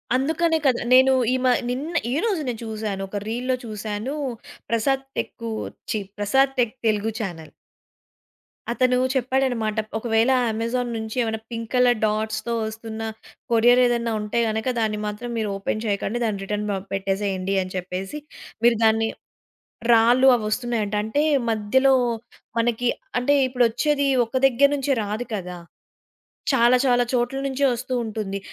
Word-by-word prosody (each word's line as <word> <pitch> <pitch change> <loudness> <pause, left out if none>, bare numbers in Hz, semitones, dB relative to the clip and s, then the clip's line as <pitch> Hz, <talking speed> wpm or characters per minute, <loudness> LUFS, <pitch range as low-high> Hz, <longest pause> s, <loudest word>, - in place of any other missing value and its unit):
అందుకనే 320 +5 +1
కదా! 255 -3 +3
నేను 260 +1 +7 0.2
ఈమ 255 0 +1 0.2
నిన్న 280 +7 -3 0.2
ఈరోజు 370 - 0
నేను 235 -3 -3
చూసాను, 215 -3 -4
ఒక 205 - -4
రీల్‌‌లో 250 +3 -1
చూసాను. 215 +4 -4 0.5
Prasad 265 +4 +1
tech 230 -1 -4 0.4
ఛి 215 - 0 0.2
Prasad 265 +7 +2
tech 235 -3 +2
Telugu 215 +1 +1
channel. 175 -7 -6 1.2
అతను 250 +1 +2 0.2
చెప్పాడన్నమాట. 250 -4 0 0.2
"ఒకవేళ 225 +2 +2 0.2
అమెజాన్ 230 +3 -2
నుంచి 220 0 -5
ఏమైనా 220 -1 -2
పింక్ 230 -1 -5
కలర్ 250 -2 +4
డాట్స్‌తో 215 +2 -1
వస్తున్న, 220 0 -6 0.5
కొరియరేదన్నా 240 0 +4
ఉంటే 210 +3 -1
గనుక, 220 +2 -2
దాన్ని 215 -2 0
మాత్రం 210 +4 -5
మీరు 215 -2 -1
ఓపెన్ 215 +2 -3
చేయకండి. 205 +2 -1
దాన్ని 210 -4 -1
రిటర్న్ 210 +1 -2
ప - - 0 0.2
పెట్టేసేయండి," 195 -1 -1
అని 185 - -9
చెప్పేసి 185 +9 -5 0.5
మీరు 240 -1 +5
దాన్ని 225 0 +3 0.9
రాళ్లు 240 +4 +5
అవొస్తున్నాయంట. 215 -1 -2
అంటే 220 +8 0 0.3
మధ్యలో 260 +6 +3 0.6
మనకి 235 +1 +1 0.3
అంటే 250 +4 +2
ఇప్పుడొచ్చేది 255 +4 +1 0.2
ఒక 245 +3 -3
దగ్గర 270 +2 +4
నుంచే 280 0 -1
రాదు 210 +4 -3
కదా! 180 -2 -6 1.0
చాలా, 245 0 +5
చాలా 245 -1 +4
చోట్ల 245 +2 0
నుంచే 275 +1 0
వస్తూ 240 +2 -4
ఉంటుంది. 210 -3 -4
230 Hz, 130 wpm, -23 LUFS, 215-255 Hz, 1.2 s, నేను